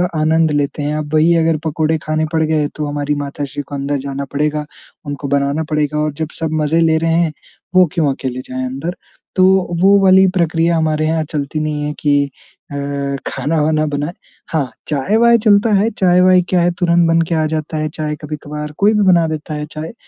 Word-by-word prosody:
आनंद 160 0 +2
लेते 145 0 -1
हैं। 150 +1 -1
अब 150 0 -5
वही 160 +2 +4
अगर 165 -1 +2
पकोड़े 160 +1 0
खाने 155 0 0
पड़ 160 - +2
गए, 155 -2 +1
तो 150 - -3
हमारी 145 0 -2
माताश्री 140 0 -5
को 145 - -6
अंदर 140 +1 -2
जाना 140 0 -4
पड़ेगा, 150 +1 -1 0.4
उनको 145 0 -5
बनाना 140 +3 0
पड़ेगा 150 -1 0
और 150 0 0
जब 155 +1 -4
सब 160 -1 -2
मज़े 160 +3 +2
ले 160 -1 +3
रहे 165 0 0
हैं, 165 -1 +2 0.4
वो 185 0 +7
क्यों 150 -5 +1
अकेले 130 -1 -5
जाएँ 130 0 -3
अंदर? 140 +8 -4 0.4
तो 185 - +4 0.4
वो 200 +1 +6
वाली 190 0 +6
प्रक्रिया 165 0 +1
हमारे 155 -1 0
यहाँ 160 0 0
चलती 150 +1 -3
नहीं 150 -1 -2
है 150 - -3
कि 145 -1 +2 0.5
अ, - - -5 0.5
खाना-वाना 155 0 0
बनाए। 145 +3 -3 0.4
हाँ! 140 -6 0 0.2
चाय-वाय 220 - +3
चलता 205 +1 +4
है। 220 +3 +2
चाय-वाय 180 0 +5
क्या 180 -2 +2
है, 175 +1 +2
तुरंत 170 -1 +3
बन 165 0 +3
के 170 - +1
आ 155 -1 +1
जाता 155 0 -3
है, 155 0 -1
चाय 150 -1 -3
कभी-कभार 150 0 -6
कोई 210 +2 +4
भी 210 - +2
बना 170 -3 +4
देता 155 0 -5
है 150 0 -4
चाय। 160 +6 -6
155 Hz, 195 wpm, -17 LUFS, 145-165 Hz, 0.5 s, वो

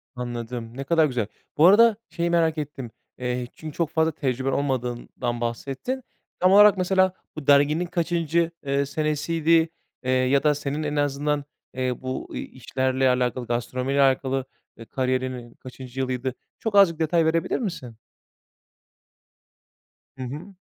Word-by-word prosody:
Anladım, 120 -1 -5
ne 135 - -3
kadar 160 +3 +3
güzel. 125 -7 -1 0.3
Bu 155 - +6
arada, 220 +2 +7
şeyi 170 0 -1
merak 165 -2 +2
ettim. 135 -5 -5 0.3
Eee, 125 0 -2
çünkü, 155 -2 -8
çok 165 -3 0
fazla 160 0 +2
tecrüben 135 -3 -1
olmadığından 125 -3 -2
bahsettin. 135 - -3 0.4
Tam 185 +1 +4
olarak, 205 0 +8
mesela, 185 0 +2 0.2
bu 155 -3 -8
derginin 145 +4 +4
kaçıncı, 170 -1 0
eee, 140 0 +1
senesiydi, 160 +2 +1 0.3
eee, 130 - 0
ya 130 +2 +3
da, 150 -1 +3
senin, 145 +1 -3
en 150 0 -2
azından, 145 0 0 0.3
eee, 125 -1 -2
bu 130 0 -5
i - - -3
işlerle 130 0 -1
alakalı, 125 0 0
gastronomiyle 125 +3 -1
alakalı, 135 0 +2 0.3
e, 115 - -10
kariyerinin 130 -2 -2
kaçıncı 130 0 -10
yılıydı? 130 0 -2 0.3
Çok, 220 -2 -2
azıcık 180 -5 +6
detay 165 +1 +2
verebilir 165 +7 +1
misin? 135 - -5 2.2
Hı 130 - -5
hı. 155 +10 -7
140 Hz, 140 wpm, -24 LUFS, 130-165 Hz, 2.2 s, olarak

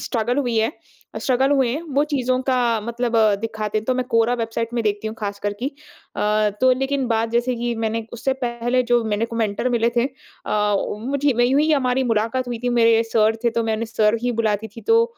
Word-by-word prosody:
Struggle 240 +1 -1
हुई 245 -5 0
है 220 +5 +2 0.5
struggle 265 +1 +2
हुए 265 -3 +3
हैं। 295 - -2
वो 285 +2 +3
चीज़ों 255 -1 +1
का 260 0 0 0.3
मतलब 235 +1 -2 0.2
दिखाते 215 -1 -2
हैं। 215 - -6
तो 255 - 0
मैं 255 0 -1
कोरा 230 +1 +3
वेबसाइट 230 0 -2
में 235 - 0
देखती 210 +1 -1
हूँ 220 - -4
ख़ास 205 -1 -4
करके 205 +4 -3
अ, 215 -7 -2
तो 255 0 +5
लेकिन 270 -1 -1
बात 225 0 +1
जैसे 240 +2 +1
कि 240 0 -2
मैंने 225 +1 -1
उससे 250 +3 -1
पहले 240 +1 0
जो 240 -1 +4
मैंने 215 +1 0
को 230 0 -7
मेंटर 220 +2 0
मिले 235 0 +2
थे 235 - +3 0.4
अ, 210 -1 +1 0.3
मुझे 280 +1 +1
वही 245 +1 +2
हुई 295 +4 +3
हमारी 260 -2 +1
मुलाकात 230 +4 -1
हुई 240 -2 -3
थी। - - +2
मेरे 230 0 +5
सर 220 0 +3
थे 235 - +4
तो 230 0 -1
मैंने 220 0 -1
सर 220 -1 +2
ही 245 0 0
बुलाती 215 0 0
थी 230 - -7
तो 455 +1 +4
235 Hz, 215 wpm, -21 LUFS, 220-255 Hz, 0.5 s, तो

